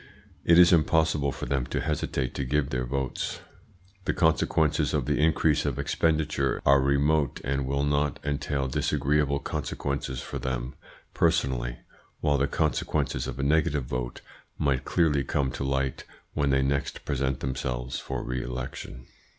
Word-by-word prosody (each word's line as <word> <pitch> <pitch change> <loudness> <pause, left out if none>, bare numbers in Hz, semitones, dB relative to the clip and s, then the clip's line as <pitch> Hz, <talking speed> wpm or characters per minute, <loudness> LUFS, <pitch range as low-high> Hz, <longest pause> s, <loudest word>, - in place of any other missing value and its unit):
It 85 - +5
is 90 0 +8
impossible 80 -3 +3
for - - -6
them 70 -3 -1
to - - -2
hesitate 70 -4 -2
to - - -2
give 70 +2 0
their 65 0 -1
votes. 65 0 -3 0.6
The - - 0
consequences 80 -2 +2
of - - 0
the 75 -1 0
increase 75 -1 +3
of 70 -4 -1
expenditure 75 -4 +1
are 70 0 +6
remote 70 +1 +2
and 70 0 -1
will 70 +1 0
not 70 -1 +1
entail 70 -1 -1
disagreeable 70 +1 +1
consequences 70 -2 -3
for 70 - -5
them 65 0 -3 0.4
personally, 65 -8 +1 0.4
while 75 -2 +2
the 70 - +2
consequences - - 0
of 65 -1 -5
a 70 - -2
negative 75 -2 +2
vote - - -4 0.4
might 70 -4 0
clearly 75 -5 +2
come 70 -2 0
to - - -4
light 65 -1 -1 0.3
when 70 -2 +1
they 65 0 +3
next 70 +1 -2
present 65 -1 -1
themselves 65 -2 -3
for - - -4
re 65 0 -2
election. 60 0 -6
70 Hz, 150 wpm, -27 LUFS, 65-75 Hz, 0.6 s, is